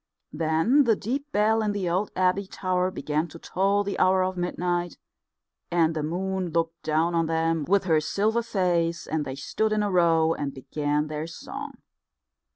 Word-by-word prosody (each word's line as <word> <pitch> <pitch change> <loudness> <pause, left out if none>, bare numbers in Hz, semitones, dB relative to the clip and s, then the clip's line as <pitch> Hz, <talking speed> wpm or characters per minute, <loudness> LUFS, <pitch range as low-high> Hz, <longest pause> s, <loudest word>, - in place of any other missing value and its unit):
Then 165 - +3
the 225 -2 +4
deep 275 +9 -4
bell 220 +2 +3
in 210 -1 0
the 200 -3 -2
old 185 +4 0
abbey 185 +1 +1
tower 185 -1 -1
began 155 -2 -2
to 170 - -11
toll 195 +4 +1
the 200 -1 -4
hour 185 0 +4
of 185 0 -2
midnight, 175 -1 -2 0.7
and 165 -2 +2
the 155 - -1
moon 185 +3 -2
looked 165 0 -1
down 160 +2 +1
on 165 -1 +1
them 165 -1 0
with 200 +1 +3
her 160 -4 +2
silver 215 +8 0
face, 175 -6 0
and 155 -2 -2
they 130 - -5
stood 215 +10 -1
in 215 -1 +1
a 205 - -1
row 165 -2 +3
and 140 -3 -4
began 145 +2 -1
their 155 +1 -4
song. 165 - -7
175 Hz, 175 wpm, -26 LUFS, 160-195 Hz, 0.7 s, the